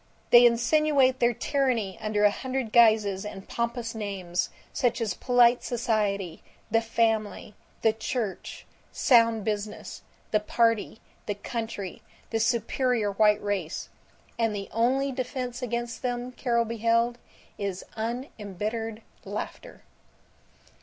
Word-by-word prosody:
They 240 0 +9
insinuate 260 +2 +3
their 240 0 +4
tyranny 250 -10 0
under 210 -1 0
a 205 - +6
hundred 260 -1 -3
guises 215 -4 +5
and 200 -2 -8
pompous 235 0 -2
names, 195 -5 -3 0.2
such 245 -3 +1
as 220 -5 -1
Polite 245 +1 +4
Society, 210 -7 -1 0.3
the 225 +1 +4
Family, 225 -2 0 0.3
the 220 - +4
Church, 220 -2 -4 0.3
Sound 230 -4 +4
Business, 210 -1 -4 0.3
the 215 - +4
Party, 225 0 +1 0.3
the 205 - -1
Country, 205 -3 -5 0.3
the 225 - 0
Superior 230 -1 +1
White 210 +1 +3
Race; 195 -6 -3 0.5
and 225 -2 +1
the 200 -1 -5
only 260 +5 +1
defense 250 -1 -4
against 240 -1 -3
them, 245 0 -3
Carol 235 -2 0
beheld, 230 +1 +1 0.4
is 195 -2 -3
unembittered 225 -1 -4 0.2
laughter. - - -7
230 Hz, 115 wpm, -27 LUFS, 210-245 Hz, 0.5 s, They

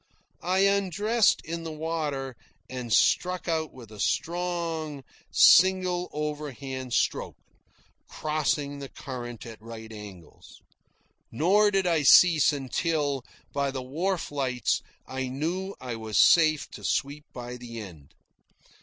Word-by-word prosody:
I 185 +2 +1
undressed 200 +3 +2
in 165 +1 -4
the 165 - -5
water 150 -5 -3 0.3
and 125 -2 -6
struck 180 +11 +2
out 160 -3 -1
with 120 -4 -13
a 105 - -11
strong, 165 - -2 0.3
single 185 -1 +5
overhand 140 -4 -5
stroke, - - 0 0.7
crossing 150 -2 -1
the 140 -1 -7
current 120 -3 -7
at 115 -2 -10
right 110 0 -9
angles. 100 -5 -12 0.7
Nor 195 - +4
did 195 -2 +1
I 165 -3 +2
cease 155 +1 +7
until, 145 0 -1 0.3
by 140 -1 0
the 135 -1 -4
wharf 170 +8 -2
lights, 130 -4 0 0.2
I 130 0 -4
knew 170 +9 -3
I 125 -2 -5
was 110 -1 -3
safe 155 -3 +5
to - - -10
sweep 145 +2 -1
by 125 0 -7
the 120 -2 -8
end. 85 -10 -11
145 Hz, 125 wpm, -27 LUFS, 125-170 Hz, 0.7 s, cease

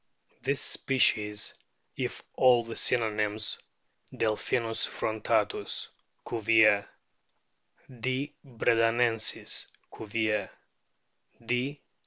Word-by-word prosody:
This 140 +1 0
species, 105 -6 +1 0.4
if - - -4
all 125 -2 +5
the 115 0 -7
synonyms 110 -2 0 0.5
(Delphinus 115 +1 0
frontatus^ 110 -1 -1 0.4
Cuvier; 110 -2 +4 1.1
D. 130 +4 -2
bredanensis, 115 -2 +2 0.3
Cuvier; 110 -1 -1 1.0
D. 125 +5 -1
115 Hz, 65 wpm, -29 LUFS, 110-125 Hz, 1.1 s, all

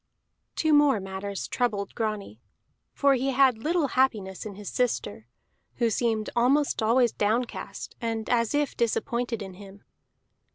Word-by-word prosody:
Two 315 -1 +2
more 290 -6 +5
matters 195 +1 -5
troubled 210 -5 -1
Grani. 210 - -4 0.5
For 280 -1 +3
he 265 +1 0
had 260 -3 +4
little 315 +2 0
happiness 215 -8 0
in 200 - -8
his 205 0 -10
sister, 120 - -1 0.5
who 235 -2 +1
seemed 220 -1 0
almost 270 +4 +2
always 235 +2 +3
downcast, 225 +4 -2
and 225 -2 -2
as 230 +1 +1
if 290 -2 0
disappointed 235 -1 -1
in 190 -1 -8
him. 200 +1 -13
230 Hz, 135 wpm, -27 LUFS, 205-260 Hz, 0.5 s, more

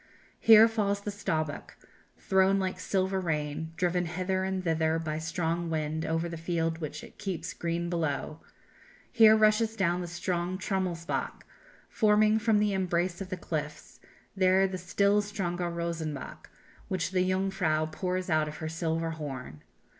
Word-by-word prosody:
Here 225 0 +8
falls 205 -3 -1
the 205 - -4
Staubbach, 155 -7 -3 0.4
thrown 190 +1 +3
like 190 -1 -2
silver 190 0 0
rain, 160 -2 -2
driven 180 -1 +1
hither 185 +2 -1
and 190 -1 -2
thither 160 -1 +1
by 155 -1 -3
the 165 +1 -2
wind 155 0 -2
over 165 +1 0
the 170 -1 -6
field 165 -1 -1
which 155 -2 -6
it - - -14
keeps 180 -3 -4
green 170 0 -2
below; 160 -2 -2 0.7
here 220 -3 +7
rushes 215 +1 +3
down 180 -4 +1
the 175 - -4
strong 175 +1 -2
Trummelsbach, 185 -3 -2 0.4
foaming 215 0 +3
from 220 -1 +3
the 210 -1 +2
embrace 180 -1 0
of 190 - -6
the 185 - -3
cliffs; 150 -3 -5 0.4
there 190 0 +4
the 185 -1 -5
still 200 +4 +2
stronger 180 -4 -3
Rosenbach, 170 -3 -5 0.4
which 185 -1 -2
the 185 -1 +1
Jungfrau 185 -5 +1
pours 185 +2 -2
out 155 -3 +2
of 150 0 -7
her 160 -1 -4
silver 165 0 -2
horn. 135 - -7
175 Hz, 150 wpm, -29 LUFS, 160-190 Hz, 0.7 s, Here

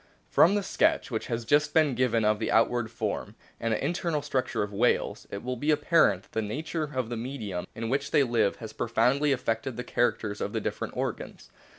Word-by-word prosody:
o - - -31 0.3
From 185 +5 +5
the 205 - 0
sketch 185 - +1
which 110 - -3
has 115 -2 -3
just 145 +5 +2
been 155 -4 +4
given 115 -3 +1
of 105 0 +2
the 110 - -1
outward 115 0 +2
form 115 - -4 0.2
and 115 - -1
the 110 - 0
internal 165 -2 -1
structure 135 -6 -1
of 105 0 -6
whales, 120 +5 +1
it 100 - -6
will 125 +1 -2
be 145 +6 -2
apparent 150 - +3
that - - -25
the 110 - -1
nature 155 +9 -3
of 130 -3 -1
the 120 - -3
medium 110 -7 -5
in 115 0 -4
which 140 +3 -1
they 145 - +4
live 115 -5 +1
has 110 -2 -9
profoundly 130 +5 +2
affected 120 -1 -1
the 125 - -3
characters 110 -4 -1
of - - -3
the - - 0
different - - -4
organs. - - -5
120 Hz, 215 wpm, -28 LUFS, 110-145 Hz, 0.3 s, From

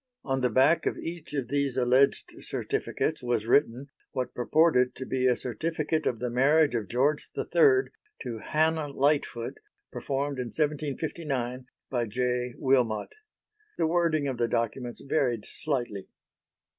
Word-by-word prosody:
On 135 -1 -1
the 125 - +2
back 135 +8 +3
of - - -1
each 165 -1 -6
of 130 -4 -2
these 140 -2 0
alleged 130 +2 +3
certificates 160 - -2
was 120 -3 -1
written 130 +2 +2 0.2
what 130 -2 -3
purported 125 -1 +3
to 130 - -6
be 130 -1 +1
a 125 - +4
certificate 155 +6 -2
of 120 - 0
the 125 +1 -3
marriage 145 +4 +4
of 110 -4 -2
George 140 +5 +1
III 415 -5 +3 0.3
to 115 -2 -5
Hannah 160 0 +1
Lightfoot 140 -4 0 0.3
performed 140 0 -2
in 125 - -2
1759 145 -3 -2 0.2
by 120 -3 0
J. 125 +2 -1
Wilmot. 125 -6 +1 0.6
The 165 - +2
wording 160 -3 +1
of 130 -3 -3
the 120 - +2
documents 120 +1 -2
varied 130 -6 0
slightly. 120 -10 -3
130 Hz, 140 wpm, -28 LUFS, 125-150 Hz, 0.6 s, a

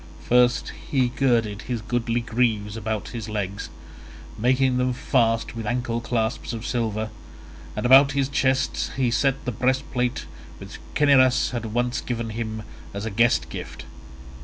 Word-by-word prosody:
First 125 0 +3 0.2
he 130 -3 +2
girded 115 -5 +1
his 120 -2 -1
goodly 120 0 -1
greaves 110 -3 0
about 110 -1 -3
his 115 -3 -6
legs, 100 -2 -4 0.7
making 125 +2 +2
them 125 0 +1
fast 115 -1 +1
with 115 -2 -5
ankle 120 0 -1
clasps 115 +1 -2
of 115 0 -5
silver; 110 -3 -2 0.6
and - - -3
about 135 +2 +7
his 140 -1 +1
chest 135 -1 0
he 125 -3 +2
set 135 +2 +1
the 125 - -1
breastplate 125 +1 -1 0.3
which - - -10 0.2
Cinyras 135 -3 +4
had 120 -2 -3
once 120 +2 -1
given 115 -2 -3
him 110 -1 -4 0.3
as 100 +2 -4
a 110 - -3
guest 100 - +2
gift. 65 - -7
120 Hz, 145 wpm, -24 LUFS, 110-125 Hz, 0.7 s, about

